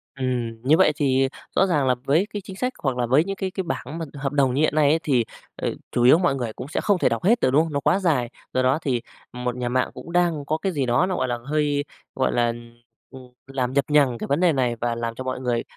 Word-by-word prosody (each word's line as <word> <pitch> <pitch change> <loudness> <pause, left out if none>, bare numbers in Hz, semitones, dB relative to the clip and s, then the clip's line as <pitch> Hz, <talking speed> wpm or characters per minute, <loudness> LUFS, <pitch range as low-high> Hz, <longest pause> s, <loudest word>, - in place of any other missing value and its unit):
Ừm, 120 -4 -3
như 150 +5 +4
vậy 155 - +5
thì 135 -3 +2 0.3
rõ 195 - +4
ràng 150 -6 +1
là 125 - +3
với 160 +9 +2
cái 205 - -3
chính 190 0 -10
sách 250 +6 -2
hoặc 135 -3 0
là 125 - +1
với 130 +6 +4
những 195 +2 -4
cái 190 -1 -3
cái 190 - -3
bảng 160 -3 -5
mà 165 - -3
hợp 140 -1 -3
đồng 135 -3 +2
như 140 - +1
hiện 155 - +2
nay 150 -2 +4
ấy 160 - +3
thì, 125 -6 +2 0.3
ờ, - - -2 0.2
chủ 120 - +1
yếu 130 +6 +7
mọi 175 -6 +1
người 120 -4 -3
cũng 125 - -8
sẽ - - -2
không 205 -2 +2
thể - - +3
đọc 115 -1 -2
hết 230 +6 +4
được, - - +3
đúng 150 +4 +4
hông? 160 -2 -6
Nó 140 - +1
quá 185 - +2
dài, 150 -11 +1 0.2
do 130 - +2
đó 130 +4 +2
thì 125 -5 -1 0.3
một 125 0 -3
nhà 125 -1 -2
mạng 130 +1 +1
cũng 170 - -10
đang 170 -5 +1
có 155 - 0
cái 195 +4 -2
gì 145 -6 -1
đó 125 +8 +2
nó, 185 0 -2
gọi - - 0
là, 120 -1 -1
hơi, 145 -1 0 0.3
gọi 130 - +1
là, 120 -1 +2 0.6
ừm, 130 -1 -12 0.2
làm 130 -2 -2
nhập 140 -2 +2
nhằng 140 -5 +3
cái - - -5
vấn 140 +3 +1
đề 175 -2 +4
này 125 -3 0
và 115 0 -2
làm 115 0 -3
cho 130 - -6
mọi 130 0 -3
người 120 -2 -1
135 Hz, 280 wpm, -23 LUFS, 125-160 Hz, 0.6 s, yếu